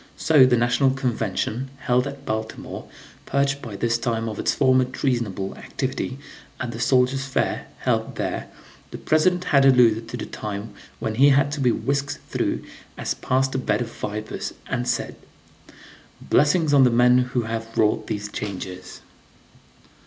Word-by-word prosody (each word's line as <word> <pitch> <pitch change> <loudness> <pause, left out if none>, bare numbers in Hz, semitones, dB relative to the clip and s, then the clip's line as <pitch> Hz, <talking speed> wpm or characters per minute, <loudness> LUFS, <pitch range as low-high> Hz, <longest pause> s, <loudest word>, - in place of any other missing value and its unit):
So 150 -5 +6
the 125 -1 +3
National 120 +3 +3
Convention, 125 -1 -2
held 125 +2 +2
at 140 0 -8
Baltimore, 110 0 -5 0.4
purged 140 0 +1
by 110 -4 -7
this 115 +3 0
time 115 -1 -1
of 110 -2 -5
its - - +1
former 130 -2 +4
treasonable 120 -7 -2
activity, 130 0 -4 0.4
at 120 -2 -3
the 115 - -7
Soldiers' 130 +2 +2
Fair, 135 - -1
held - - 0
there, - - -3 0.4
the - - -7
President 180 +3 +2
had 140 -5 +4
alluded 115 -4 +4
to - - -5
the - - -5
time 105 0 -6 0.2
when 110 - -3
he 135 +6 +6
had 140 0 +3
to 145 - -4
be 125 -3 +3
whisked 140 +3 -1
through - - -1 0.3
as - - -2
past 130 +1 0
a 130 - 0
bed 110 -4 0
of 115 -1 -4
vipers, 105 0 -5
and 125 0 -2
said: - - -2 1.0
"Blessings 150 +2 +2
on 140 -2 +7
the 125 - +6
men 125 +1 +5
who 125 -1 0
have 115 0 -5
wrought 105 -1 +2
these 105 -1 -3
changes!" 95 -3 -6
125 Hz, 160 wpm, -23 LUFS, 110-135 Hz, 1.0 s, on